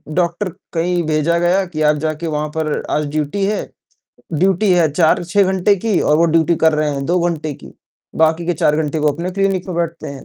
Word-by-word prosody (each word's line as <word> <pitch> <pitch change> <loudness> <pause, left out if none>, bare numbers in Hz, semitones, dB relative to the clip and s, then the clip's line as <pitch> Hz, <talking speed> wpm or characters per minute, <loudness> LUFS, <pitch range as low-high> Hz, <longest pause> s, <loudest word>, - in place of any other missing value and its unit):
doctor 180 +3 0 0.2
कहीं 175 +1 0
भेजा 155 +2 +1
गया 180 +3 +2
कि 160 -3 -6
आप 150 0 +3
जाके 155 +2 -3
वहाँ 150 -1 -2
पर 155 -1 -1 0.3
आज 150 - -1
ड्यूटी 155 +6 -1
है 210 +1 -1 0.7
ड्यूटी 190 +4 +2
है 170 -4 +3
4-6 175 +4 +2
घंटे 190 +2 +3
की 210 -6 +2
और 150 - +3
वो 165 - +3
ड्यूटी 165 +1 +2
कर 160 - +5
रहे 150 0 0
हैं 140 -1 -3
2 175 +1 +1
घंटे 155 -2 -3
की, - - -14 0.4
बाकी 160 +1 +2
के 175 - 0
4 150 0 +1
घंटे 155 +1 -2
वो 150 -1 +2
अपने 175 +4 -4
क्लिनिक 195 -1 -1
पे 185 - -4
बैठते 170 -1 -3
हैं 140 -1 -9
165 Hz, 210 wpm, -18 LUFS, 155-180 Hz, 0.7 s, कर